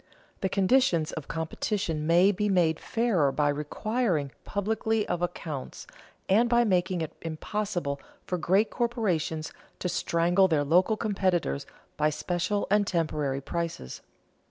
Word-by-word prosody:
The 190 Hz, -, 0 dB
conditions 190 Hz, -5 st, +3 dB
of 155 Hz, -3 st, -6 dB
competition 160 Hz, 0 st, -2 dB
may 175 Hz, +4 st, +5 dB
be 210 Hz, +1 st, -1 dB
made 170 Hz, -5 st, +2 dB
fairer 205 Hz, -, +1 dB
by 145 Hz, +2 st, +1 dB
requiring 155 Hz, -, -1 dB
publicity 220 Hz, +1 st, -1 dB
of 175 Hz, -, -2 dB
accounts, 160 Hz, -6 st, -5 dB, 0.4 s
and 225 Hz, +5 st, +4 dB
by 240 Hz, 0 st, +4 dB
making 180 Hz, -4 st, +1 dB
it 160 Hz, -, -4 dB
impossible 165 Hz, -2 st, -3 dB, 0.2 s
for 180 Hz, -, -2 dB
great 190 Hz, +7 st, +2 dB
corporations 190 Hz, -10 st, -1 dB, 0.2 s
to -, -, -3 dB
strangle 175 Hz, +2 st, +2 dB
their 155 Hz, -5 st, +2 dB
local 180 Hz, +9 st, +3 dB
competitors 185 Hz, -, 0 dB, 0.3 s
by 150 Hz, -, +3 dB
special 180 Hz, +6 st, -1 dB
and 205 Hz, -1 st, +3 dB
temporary 150 Hz, -6 st, -1 dB
prices. 165 Hz, -, -4 dB
175 Hz, 130 wpm, -28 LUFS, 155-205 Hz, 0.4 s, may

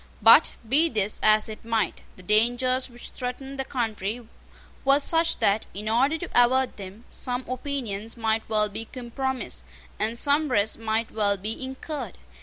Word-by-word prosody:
But, -, -, +7 dB
be 305 Hz, +8 st, +4 dB
this 210 Hz, -4 st, -1 dB
as 215 Hz, 0 st, +5 dB
it 215 Hz, -1 st, -9 dB
might, 225 Hz, -5 st, -1 dB
the 185 Hz, -, -15 dB
dangers 245 Hz, +6 st, +2 dB
which 240 Hz, 0 st, -11 dB
threatened 265 Hz, +2 st, -6 dB
the -, -, 0 dB
country 225 Hz, -3 st, -3 dB, 0.6 s
were 275 Hz, +1 st, +5 dB
such 330 Hz, +3 st, +4 dB
that, 200 Hz, +2 st, +1 dB
in 210 Hz, +2 st, -5 dB
order 265 Hz, +8 st, +2 dB
to 345 Hz, -, -6 dB
avert 255 Hz, +1 st, +3 dB
them, 200 Hz, +4 st, -10 dB
some 250 Hz, 0 st, -3 dB
opinions 245 Hz, -5 st, -4 dB
might 225 Hz, -1 st, 0 dB
well 215 Hz, -1 st, +2 dB
be 215 Hz, +2 st, -7 dB
compromised, 260 Hz, +2 st, -4 dB, 0.4 s
and 225 Hz, +2 st, 0 dB
some 290 Hz, +3 st, +2 dB
risks 215 Hz, -3 st, +1 dB
might 225 Hz, 0 st, -2 dB
well 205 Hz, -2 st, +1 dB
be 215 Hz, +6 st, -5 dB
incurred. 265 Hz, -, -6 dB
235 Hz, 160 wpm, -25 LUFS, 215-265 Hz, 0.6 s, But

